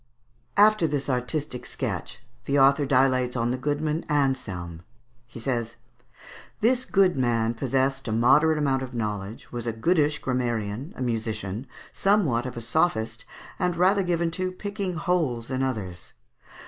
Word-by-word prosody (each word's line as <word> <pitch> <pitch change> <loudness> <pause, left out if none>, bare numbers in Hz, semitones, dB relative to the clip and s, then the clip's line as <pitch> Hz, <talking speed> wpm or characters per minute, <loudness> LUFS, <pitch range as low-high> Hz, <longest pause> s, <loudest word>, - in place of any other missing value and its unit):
After 210 -4 +5
this 140 -2 -1
artistic 125 +1 -2
sketch, - - -5 0.2
the 140 - +1
author 140 +1 +5
dilates 130 -2 +2
on 120 0 0
the 125 - -1
goodman 150 +3 -1
Anselme. 125 - -1 0.5
He 120 - -10
says: 115 -1 -2 0.8
"This 250 +3 +2
good 190 -2 +3
man 115 -3 +1
possessed 135 +2 0
a - - -1
moderate 150 +8 +4
amount 135 -3 +1
of 130 -1 -6
knowledge, 105 -1 -4
was 120 -1 -5
a 115 - -1
goodish 150 +5 +2
grammarian, 120 - -2
a 130 - -2
musician, 110 -1 -3 0.3
somewhat 160 - +2
of 125 - -7
a - - -4
sophist, 115 -2 0 0.3
and 180 -1 +1
rather 190 +3 +3
given 170 -2 0
to 185 +2 -2
picking 200 -1 -4
holes 155 -9 -1
in 130 0 -1
others." 105 -10 -4
130 Hz, 145 wpm, -26 LUFS, 115-160 Hz, 0.8 s, After